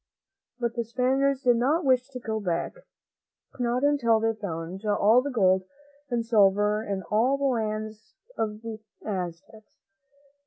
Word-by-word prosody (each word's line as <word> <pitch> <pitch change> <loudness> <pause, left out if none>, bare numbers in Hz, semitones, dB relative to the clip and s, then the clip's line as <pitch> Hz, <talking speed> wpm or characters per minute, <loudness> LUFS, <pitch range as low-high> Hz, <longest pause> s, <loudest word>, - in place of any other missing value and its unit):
But 235 -2 -2
the 235 -1 -2
Spaniards 265 +4 +1
did 245 -2 +4
not 285 +7 +1
wish 255 -1 +3
to 255 -2 -7
go 220 -2 -3
back, 175 -5 -2 0.9
not 245 +1 0
until 240 -6 +3
they 225 +1 +1
had 220 -1 -4
found 180 0 -5
all 210 +3 +4
the 285 - -4
gold 190 -6 +2 0.4
and 235 -2 -1
silver 210 -1 +3
in 195 -3 -3
all 240 +6 +3
the 280 - -5
land 215 -4 -1 0.4
of 215 0 -3
the 225 -1 -6 0.3
Aztecs. 190 +2 -6
225 Hz, 150 wpm, -26 LUFS, 210-250 Hz, 0.9 s, did